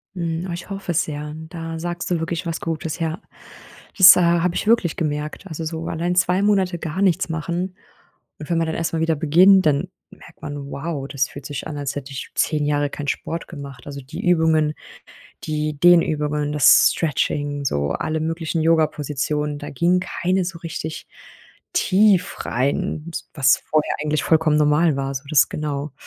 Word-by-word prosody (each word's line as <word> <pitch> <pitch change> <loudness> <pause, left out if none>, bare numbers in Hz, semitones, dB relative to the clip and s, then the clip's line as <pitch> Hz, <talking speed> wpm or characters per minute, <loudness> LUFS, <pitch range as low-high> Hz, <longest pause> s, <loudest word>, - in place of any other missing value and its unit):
Mhm, 170 0 -3
oh, - - -3
ich 175 - -7
hoffe 195 -3 -4
es 165 - +2
sehr. 150 0 -6 0.2
Da 165 -1 -6
sagst 175 +1 -4
du 175 -2 0
wirklich 165 +1 -3
was 165 0 -3
Gutes. 160 0 -4
Ja, 165 +3 -2 0.8
das 190 -2 +10
habe 170 0 +2
ich - - -2
wirklich 225 -8 +3
gemerkt. 150 +3 -3
Also, 160 -1 -6
so 160 +1 -4
allein 175 +2 -2
2 180 +1 +2
Monate 190 -4 +1
gar 165 +4 -4
nichts 185 -3 +2
machen. 175 +3 -3 0.6
Und 150 - -9
wenn 170 - +1
man 165 -1 +1
dann 160 - -3
erstmal 165 -1 -2
wieder 165 0 +1
beginnt, 180 +6 +5
dann 150 +4 +2 0.2
merkt - - -17
man: 145 -1 -6
„Wow, 140 -2 -4
das 140 -2 -1
fühlt 140 -1 -10
sich 145 -1 -5
an, 150 - -6
als 145 -1 -3
hätte 140 0 -6
ich 135 - -7
10 150 -2 +1
Jahre 145 0 0
keinen 145 0 -6
Sport 165 - -4
gemacht“. 140 -6 -10
Also, 140 -1 -7
die 160 +10 -8
Übungen, 160 -3 +3 0.7
die 150 -1 -2
Dehnübungen, 150 -3 +3
das 150 -4 +6
Stretching, 145 -2 -1
so 70 - -1
alle 155 - -2
möglichen 165 0 -2
Yoga-Positionen. 150 -2 0
Da - - -7
ging 175 +6 +2
keine 185 0 -1
so 175 -3 -6
richtig 160 -1 -6 0.7
tief 200 - +3
rein, 140 +4 -1
s - - -6
was 135 -1 +4
vorher 155 -1 +1
eigentlich 150 -1 -1
vollkommen 160 -2 +3
normal 150 0 +3
war, 135 0 -3
so 135 - -4
das 150 - +5
genau. 145 -1 -4
160 Hz, 175 wpm, -21 LUFS, 145-170 Hz, 0.8 s, das